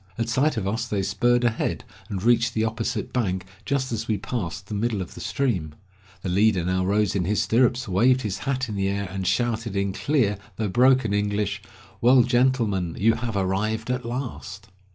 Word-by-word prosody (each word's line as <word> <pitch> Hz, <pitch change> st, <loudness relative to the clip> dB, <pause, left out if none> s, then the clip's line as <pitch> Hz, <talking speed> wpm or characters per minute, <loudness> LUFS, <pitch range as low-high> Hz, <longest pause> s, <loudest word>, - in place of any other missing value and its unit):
At 115 Hz, 0 st, -1 dB
sight 135 Hz, +3 st, +1 dB
of 100 Hz, -3 st, -1 dB
us 115 Hz, +4 st, -2 dB
they 100 Hz, -3 st, -1 dB
spurred 120 Hz, +4 st, +2 dB
ahead, 120 Hz, -2 st, 0 dB, 0.3 s
and 95 Hz, -2 st, -4 dB
reached 120 Hz, 0 st, +3 dB
the 110 Hz, -, +1 dB
opposite 115 Hz, -1 st, -3 dB
bank 95 Hz, -7 st, -1 dB, 0.2 s
just 130 Hz, -2 st, 0 dB
as 115 Hz, -1 st, -3 dB
we 110 Hz, -, +1 dB
passed 100 Hz, -5 st, -4 dB
the 105 Hz, -, -7 dB
middle 110 Hz, 0 st, -1 dB
of 90 Hz, -, -6 dB
the -, -, -9 dB
stream. 95 Hz, -, -1 dB, 0.5 s
The 95 Hz, -, -2 dB
leader 95 Hz, -1 st, +3 dB
now 95 Hz, +1 st, +1 dB
rose 100 Hz, +1 st, +1 dB
in 90 Hz, -3 st, 0 dB
his 105 Hz, +2 st, +1 dB
stirrups, 120 Hz, +3 st, +2 dB
waved 125 Hz, +7 st, +3 dB
his 105 Hz, -3 st, -3 dB
hat 135 Hz, -3 st, -1 dB
in 110 Hz, -, -5 dB
the 95 Hz, -1 st, 0 dB
air 100 Hz, 0 st, -2 dB
and 95 Hz, -1 st, -3 dB
shouted, 115 Hz, -3 st, 0 dB
in 100 Hz, 0 st, 0 dB
clear 110 Hz, -5 st, +1 dB, 0.2 s
though 110 Hz, -2 st, -2 dB
broken 125 Hz, 0 st, +4 dB
English, 100 Hz, -1 st, -1 dB, 0.4 s
"Well, 125 Hz, +1 st, +6 dB
gentlemen, 120 Hz, -8 st, +1 dB
you 115 Hz, +3 st, +4 dB
have 115 Hz, -3 st, -3 dB
arrived 110 Hz, +5 st, -1 dB
at 125 Hz, 0 st, -2 dB
last!" 115 Hz, -5 st, -6 dB
110 Hz, 195 wpm, -24 LUFS, 100-120 Hz, 0.5 s, Well